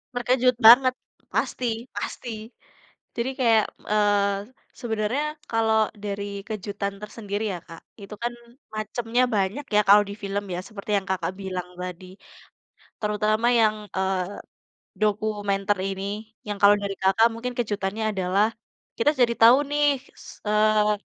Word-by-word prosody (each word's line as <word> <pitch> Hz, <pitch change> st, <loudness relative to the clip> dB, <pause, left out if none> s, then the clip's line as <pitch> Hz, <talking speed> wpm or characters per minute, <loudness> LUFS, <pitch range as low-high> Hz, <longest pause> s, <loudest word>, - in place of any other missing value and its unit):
Terkejut 250 Hz, +1 st, +2 dB
banget, 255 Hz, +2 st, +8 dB, 0.4 s
pasti 255 Hz, -, -1 dB, 0.3 s
pasti. 245 Hz, -, -5 dB, 0.9 s
Jadi 235 Hz, +2 st, -1 dB
kayak, 225 Hz, -4 st, +4 dB, 0.3 s
eee, 205 Hz, 0 st, +1 dB, 0.3 s
sebenarnya, 225 Hz, +4 st, -1 dB, 0.3 s
kalau 220 Hz, -1 st, +3 dB, 0.2 s
dari 200 Hz, 0 st, -3 dB, 0.2 s
kejutan 200 Hz, -2 st, -4 dB
tersendiri 210 Hz, -1 st, -5 dB
ya, 175 Hz, -, -5 dB
Kak, 165 Hz, -1 st, -11 dB, 0.2 s
itu 200 Hz, +1 st, -9 dB
kan 240 Hz, 0 st, -1 dB, 0.4 s
macamnya 230 Hz, +3 st, -1 dB
banyak 205 Hz, +9 st, -1 dB
ya, -, -, +7 dB
kalau 205 Hz, +1 st, +8 dB
di -, -, -5 dB
film 200 Hz, +1 st, -2 dB
ya, -, -, -3 dB
seperti 215 Hz, -2 st, -10 dB
yang 195 Hz, 0 st, -4 dB
Kakak 190 Hz, -1 st, -1 dB
bilang 185 Hz, -2 st, -4 dB
tadi, 180 Hz, 0 st, -6 dB, 1.0 s
terutama 215 Hz, +2 st, +1 dB
yang, 215 Hz, -1 st, +4 dB, 0.2 s
eee, 190 Hz, -1 st, 0 dB, 0.8 s
dokumenter 205 Hz, -1 st, 0 dB
ini, 195 Hz, 0 st, -4 dB, 0.4 s
yang 205 Hz, -1 st, -3 dB
kalau 205 Hz, 0 st, +7 dB
dari 200 Hz, -1 st, -3 dB
Kakak 195 Hz, +4 st, +5 dB
mungkin 245 Hz, +2 st, -4 dB
kejutannya 210 Hz, -2 st, -2 dB
adalah, 190 Hz, +2 st, +2 dB, 0.5 s
kita 260 Hz, +6 st, +3 dB
jadi 235 Hz, -1 st, +4 dB
tahu 235 Hz, +3 st, +9 dB
nih, 295 Hz, 0 st, +2 dB, 0.4 s
s -, -, -15 dB, 0.2 s
eee, 210 Hz, 0 st, +3 dB
210 Hz, 130 wpm, -25 LUFS, 200-230 Hz, 1.0 s, tahu